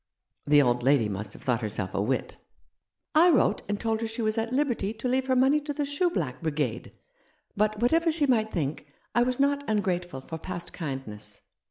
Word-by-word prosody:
" - - -60
" - - -52
The 145 0 +6
old 120 -1 +1
lady 130 -3 +3
must 100 0 -5
have - - -13
thought 125 -3 0
herself 105 -3 -3
a 100 - 0
wit." 125 +5 -2 0.4
" - - -58 0.3
I 335 +3 +6
wrote 300 - +3
and 205 0 -1
told 225 -1 -1
her 225 - -1
she 225 +1 -4
was 215 0 +1
at 225 0 -2
liberty 245 -6 0
to 230 +3 -3
leave 260 +1 +1
her 260 - +2
money 265 +4 +4
to 295 0 -5
the 295 0 -1
shoe 285 +6 +1
black 150 - -3
brigade; 145 -7 -2 0.6
but 215 +1 +1
what 240 +4 +2
ever 330 0 +3
she 310 -2 +1
might 220 -5 +2
think, 150 -2 -3 0.3
I 240 - +3
was 250 +1 0
not 280 +1 +2
ungrateful 180 -8 -1
for 160 +4 -7
past 175 0 -6
kindness. 110 - -6
210 Hz, 220 wpm, -27 LUFS, -, 0.6 s, The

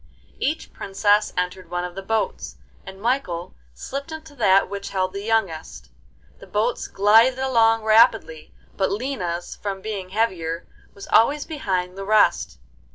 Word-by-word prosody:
Each 310 +3 -2
princess 205 +2 +1
entered 180 0 -3
one 175 0 -2
of 180 0 -5
the 195 - -6
boats, 220 +3 -2 0.3
and 190 0 -9
Michael 210 -7 -2 0.2
slipped 280 - -6
into 315 -1 -9
that 195 -7 +3
which 200 0 -6
held 185 -1 -1
the 200 - -5
youngest. 165 - -2 0.5
The - - -13
boats 220 +4 -1
glided 225 +6 +4
along 225 -4 +3
rapidly, 215 -7 +3 0.2
but 190 - 0
Lina's, 195 -7 -3
from 200 -2 -4
being 195 -2 -5
heavier, 180 -6 -1 0.3
was 200 - -9
always 285 +6 +3
behind 190 - -3
the - - -4
rest. 210 - +2
200 Hz, 145 wpm, -23 LUFS, 185-225 Hz, 0.5 s, glided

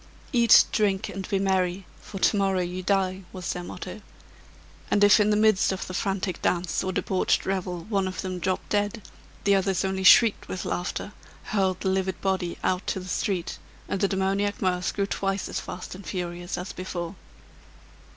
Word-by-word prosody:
"Eat, 235 -3 +7
drink, 200 -1 +1
and 195 -1 -6
be 195 - +1
merry, 190 -1 0 0.2
for 200 - -8
to 195 - +3
morrow 195 -2 +2
you 180 +1 -3
die!" 190 0 0
was 185 -2 -4
their 180 - -5
motto; - - -7 0.9
and 205 - +3
if 205 +2 +7
in 210 0 +3
the 210 - +3
midst 215 -3 +4
of 190 - -3
the 185 - -7
frantic 190 -2 -2
dance 175 -2 0
or 185 - -1
debauched 185 0 0
revel 180 -2 -2
one 195 -2 0
of 185 - -4
them 185 -1 -4
dropped 185 +1 -2
dead, 205 0 0 0.4
the 200 - +4
others 195 -1 +1
only 190 0 -2
shrieked 220 +3 +6
with 185 - -5
laughter, 180 +3 -3 0.3
hurled 190 -3 0
the 190 - 0
livid 190 -1 -1
body 190 -3 -1
out 185 0 0
to - - -1
the 185 - -9
street, 185 -1 -2 0.3
and 195 - -2
the 200 - +4
demoniac 195 +1 0
mirth 180 -1 0
grew 200 - +1
twice 195 0 -2
as - - -3
fast 180 - -7
and 190 +2 -10
furious 175 -1 -4
as 180 +2 -5
before. 175 -1 -5
190 Hz, 185 wpm, -26 LUFS, 185-200 Hz, 0.9 s, Eat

